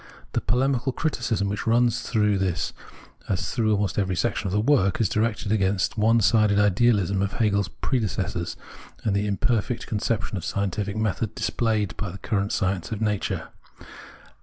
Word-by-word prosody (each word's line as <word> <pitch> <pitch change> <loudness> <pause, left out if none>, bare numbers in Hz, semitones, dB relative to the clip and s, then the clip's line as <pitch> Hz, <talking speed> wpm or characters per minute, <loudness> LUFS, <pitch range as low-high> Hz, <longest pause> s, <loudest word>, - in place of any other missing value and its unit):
The - - -1
polemical 130 +1 +1
criticism 120 -10 -1
which 100 +3 -3
runs 120 +1 +3
through 105 -4 +1
this 95 -3 -1 0.6
as 90 -2 -1
through 110 -3 +2
almost 100 0 -1
every 95 -2 0
section 105 +1 -1
of - - -2
the 105 - +1
work 105 -6 +2
is 110 - +3
directed 105 0 -1
against 95 -2 +1
the 110 - -3
one 115 +2 +4
sided 105 0 +4
idealism 105 -2 +3
of 100 0 -1
Hegel's 100 -4 +1
predecessors 115 -8 -2 0.5
and 105 -3 +1
the 100 +1 0
imperfect 115 +3 0
conception 105 -1 -2
of 85 - -5
scientific 100 +1 -2
method 110 0 -1
displayed 110 -5 0
by 105 - -3
the 90 - -8
current 100 0 -1
science 95 -4 -1
of 110 - -3
nature. 105 -2 -1
105 Hz, 160 wpm, -25 LUFS, 100-115 Hz, 0.6 s, one